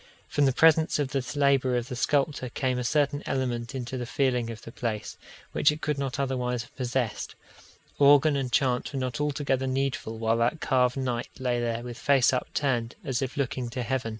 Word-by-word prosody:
From 145 - +2
the 135 - +4
presence 160 +3 +4
of 145 -3 -1
this 130 -2 -3
labour 135 -3 +3
of 120 0 -3
the 125 - -5
sculptor 140 -1 0
came 130 0 -1
a - - -2
certain 145 +2 +1
element 125 -2 -2
into 130 0 -4
the 120 - -4
feeling 125 -3 0
of 115 -1 -8
the 115 - -9
place, 115 -3 -4 0.4
which 150 - +4
it 150 - -5
could 150 -3 -2
not 135 -1 -3
otherwise 125 -3 -1
have 120 - -19
possessed: 125 -2 -2 0.6
organ 145 +1 +6
and 135 -3 -2
chant 125 +2 +1
were 135 - -2
not 130 +1 -2
altogether 140 -3 0
needful 130 -4 -2
while 115 0 +1
that 120 +7 +1
carved 125 -3 +2
knight 125 -3 -2
lay 125 -2 0
there 120 0 -2
with 120 -1 -7
face 135 -3 +4
upturned, 125 -2 -1
as 135 -4 -1
if 135 0 -3
looking 130 -3 -2
to 125 +1 -3
heaven. 130 -1 -1
130 Hz, 200 wpm, -27 LUFS, 120-140 Hz, 0.6 s, organ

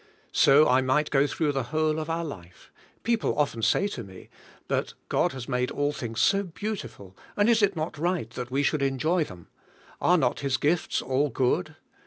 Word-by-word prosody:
So 145 +3 +6
I 130 +1 +4
might 130 +4 +1
go 140 0 +3
through 150 0 0
the 135 -1 -1
whole 155 0 +1
of 155 +1 -5
our 165 +1 -1
life. 90 - -11 0.3
Peo 235 0 +2
ple - - -2
often 140 -6 0
say 120 - +2
to 125 -12 -6
me; 95 -2 -13 0.4
"But - - 0 0.2
has 130 -2 0
God - - -11
made 125 -1 0
all 145 0 -1
things 115 -6 -5
so 195 0 +4
beautiful, 180 - -6 0.2
and 205 +1 +3
is 230 -1 +4
it 200 -1 +2
not 155 -1 -4
right 170 -8 -1
that 125 0 -6
we 135 +2 0
should 150 0 +1
enjoy 155 +5 +1
them? 90 -7 -13 0.5
Are 180 - +4
not 130 -6 +1
His 135 -2 0
gifts 160 +5 0
all 135 +3 +1
good?" 125 -6 0
145 Hz, 200 wpm, -26 LUFS, 125-165 Hz, 0.5 s, So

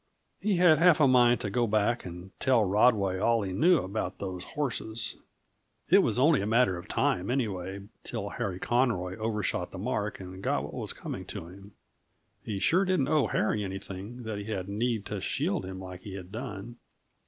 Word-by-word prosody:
He 210 -2 +1
had 170 -4 +5
half 175 -2 +6
a 145 - +6
mind 125 -2 +5
to 105 - -2
go 120 +2 +1
back 110 +3 +1
and 90 +2 -9
tell 125 -5 +3
Rodway 100 -2 +3
all 115 +1 +2
he 95 - -3
knew 165 - +4
about 100 +4 -3
those 90 -2 -5
horses; 115 -5 -3 0.8
it - - +8
was - - +2
only 140 +1 +4
a 100 - -2
matter 115 -3 +3
of 85 - -8
time, 90 +3 0
anyway, 100 -7 -2 0.2
till - - -4
Harry 95 -3 -3
Conroy 100 -6 0
overshot 105 -5 -2
the - - -9
mark 105 0 -2
and 95 0 -9
got - - 0
what - - -7
was - - -3
coming - - -6
to - - -7
him. 95 +3 -13 0.7
He 105 -3 -3
sure 175 - +3
didn't 185 -8 +1
owe 150 -3 +3
Harry 105 -1 0
anything, 100 +4 -7
that 110 -2 -4
he 100 - -6
had 100 -4 -3
need 110 +1 -1
to 105 -2 -4
shield 165 - -1
him 95 0 -6
like 90 -1 -8
he 95 0 -8
had 95 -1 -9
done. 115 -1 -6
105 Hz, 190 wpm, -29 LUFS, 95-125 Hz, 0.8 s, it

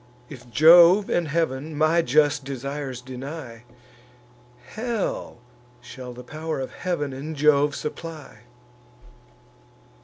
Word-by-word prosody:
If 125 -4 -12
Jove 170 - +6
and 175 -2 +1
Heav'n 150 -1 -2
my 160 +2 +3
just 145 0 +2
desires 135 -1 -5
deny, 130 -2 -8 1.0
Hell 225 - -4 0.4
shall 125 +1 -10
the 125 +1 -10
pow'r 155 +3 -5
of 130 - -5
Heav'n 150 -7 -3
and 150 +4 -6
Jove 145 0 +3
supply. 160 -1 -7
145 Hz, 100 wpm, -24 LUFS, 130-160 Hz, 1.0 s, Jove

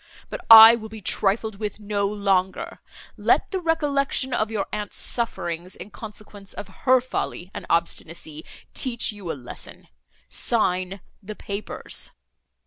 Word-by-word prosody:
But - - -6
I 225 +1 +12
will 220 -1 -8
be 220 0 -9
trifled 205 +1 0
with 210 -1 -4
no 205 -1 -1
longer: 200 - -1 0.4
let - - +2
the 380 - -1
recollection 285 -5 0
of 215 -2 0
your 215 -3 -2
aunt's 210 -1 -4
sufferings, 180 -7 -3
in 210 - -11
consequence 210 -2 -11
of - - -6 0.2
her 255 0 +7
folly 195 -7 -5
and - - -8
obstinacy, 165 -2 -2 0.3
teach 240 -4 0
you 200 -5 -6
a - - -6
lesson.—Sign 180 - -3 0.2
the 210 +1 -8
papers." 200 +1 -3
210 Hz, 135 wpm, -24 LUFS, 185-230 Hz, 0.4 s, I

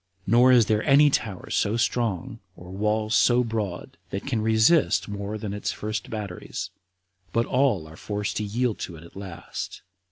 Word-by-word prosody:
Nor 120 +5 +5
is 120 -3 +6
there 105 0 +1
any 145 +2 +5
tower 105 -8 -2
so 105 +2 +1
strong, 120 0 -1 0.2
or 90 +1 -11
walls 105 +2 0
so 125 +1 +4
broad, 110 -6 -4
that 95 - -5
can 120 -6 -1
resist 110 +9 +3
any 105 - -5
more 100 +1 -4
than 105 -2 -5
its 105 - -2
first 110 +1 -4
batteries, 105 -5 -5 0.6
but 115 +4 +1
all 125 - +2
are 80 - -12
forced 105 +3 -3
to 105 - -1
yield 115 +2 -1
to 85 - -5
it 80 - -12
at 85 - -15
last. 95 -3 -7
110 Hz, 180 wpm, -25 LUFS, 100-120 Hz, 0.6 s, is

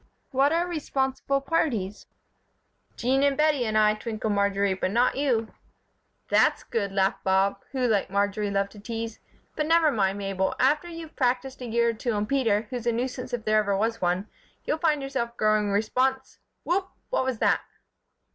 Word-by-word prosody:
"What 275 +2 +3
are 335 +2 +2
'responsible 275 -4 -1
parties'?" 260 - -1 0.9
"Jean 260 +3 +1
and 280 -1 +2
Bettie 300 -5 +2
and 215 0 0
I," 210 0 +5
twinkled 215 -1 -3
Marjory, 200 -1 +1
"but 185 0 -1
not 240 +5 +2
you." 245 -6 0 0.8
"That's - - +3
good," 200 -4 -2
laughed 195 0 0
Bob, 195 +1 +2
who, 260 -2 0
like 210 -4 +1
Marjory, 205 +1 0
loved 200 0 0
to 210 - -13
tease. 225 +1 -5 0.4
"But 305 -1 -1
never 325 -2 +4
mind, 195 -4 +1
Mabel. 195 -1 -1
After 295 +6 +2
you've 330 -2 -9
practised 260 +1 -1
a 250 - -5
year 235 +1 +2
or - - 0
two 230 +1 -2
on 205 0 0
Peter, 225 -4 +1
who's 240 -2 -4
a - - +4
nuisance 250 +2 -3
if 240 -2 -4
there 215 0 +4
ever 200 -2 0
was 225 +2 -1
one, 180 +3 0 0.4
you'll 310 - -1
find 305 -4 +1
yourself 235 -3 -3
growing 215 -1 +2
respons 255 +6 0 0.2
Whoop! 380 +2 0 0.2
What - - +1
was 260 -2 -2
that?" - - +2
235 Hz, 175 wpm, -26 LUFS, 205-270 Hz, 0.9 s, I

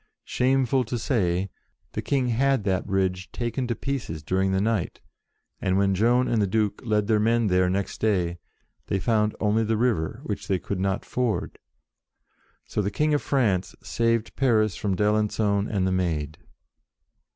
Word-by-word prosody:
Shameful 130 0 +2
to 120 +3 -3
say, 95 -6 0 0.4
the - - -3
King 130 -3 0
had 135 0 +2
that 95 -2 -1
bridge 95 -2 -1
taken 120 +1 -2
to 120 - -1
pieces 120 - -4
during 95 +4 +1
the 95 - +1
night, 105 -3 -1 0.6
and 95 0 +1
when 100 0 +3
Joan 120 +6 +3
and 115 -3 +1
the 100 - +2
Duke 105 0 0
led 105 -3 +1
their 110 0 +2
men 115 0 +2
there 90 0 +3
next 95 +1 -2
day, 90 -5 +1 0.5
they 100 - 0
found 105 +2 +1
only 110 +1 +2
the 110 0 0
river, 110 -9 0
which - - -4
they 95 - +1
could 90 +2 -4
not 95 +1 -1
ford. 125 -4 -2 1.1
So - - -2
the 100 - -1
King 150 +7 +1
of 145 - +2
France 105 -10 0
saved 115 -1 0
Paris 110 -7 +2
from 100 0 -1
d'Alencon 105 0 +1
and 100 -4 0
the 95 - +1
Maid. 80 -5 -1
105 Hz, 165 wpm, -25 LUFS, 95-115 Hz, 1.1 s, when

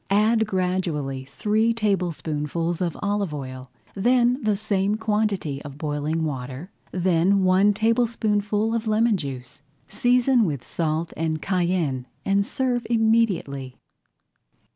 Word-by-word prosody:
Add 220 +2 +3
gradually 175 -9 -1
three 215 +10 +1
tablespoonfuls 170 -5 -1
of 170 -3 -1
olive 200 -5 -1
oil, 130 -2 -7 0.2
then 245 +5 +2
the 210 -2 +1
same 205 -1 0
quantity 210 -9 -1
of 140 -2 -9
boiling 150 +1 -2
water, 135 +4 -5 0.2
then 185 +2 +2
one 185 +3 +4
tablespoonful 220 -1 +1
of 230 -1 -2
lemon 220 +1 +3
juice. 135 -5 -6 0.3
Season 245 0 +3
with 145 - -2
salt 160 0 -2
and 160 -1 -1
cayenne 170 -8 -1 0.2
and 200 +1 +2
serve 250 -2 -1
immediately. 220 - +1
190 Hz, 115 wpm, -24 LUFS, 155-220 Hz, 0.3 s, one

